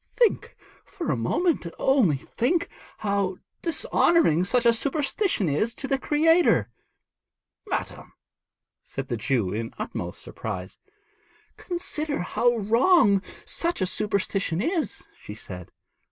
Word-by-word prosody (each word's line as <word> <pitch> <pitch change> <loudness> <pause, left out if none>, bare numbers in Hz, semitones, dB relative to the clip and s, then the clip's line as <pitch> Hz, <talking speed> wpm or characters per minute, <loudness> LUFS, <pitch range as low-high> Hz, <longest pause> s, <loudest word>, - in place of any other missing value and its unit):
'Think 475 -3 +1 0.3
for 360 -5 -4
a - - +1
moment, 185 - 0
only 240 - +3
think, 280 - -1 0.3
how 200 -3 -1 0.2
dishonouring 330 - +3
such 240 +6 +1
a 235 - +6
superstition 280 - 0
is 215 +11 0
to 270 - -4
the 270 -1 0
Creator.' 325 +5 +3 1.0
'Madam!' - - -4 0.7
said 135 -1 -6
the 120 - -1
Jew 110 -5 0
in 115 +1 -4
utmost - - -5
surprise. - - -6 0.8
'Consider 310 - -3
how 240 +6 +1
wrong 220 - +4 0.2
such 340 +1 -2
a 190 - +2
superstition 195 -3 -1
is,' 330 - -2
she - - -8
said. - - -8
235 Hz, 115 wpm, -25 LUFS, -, 1.0 s, a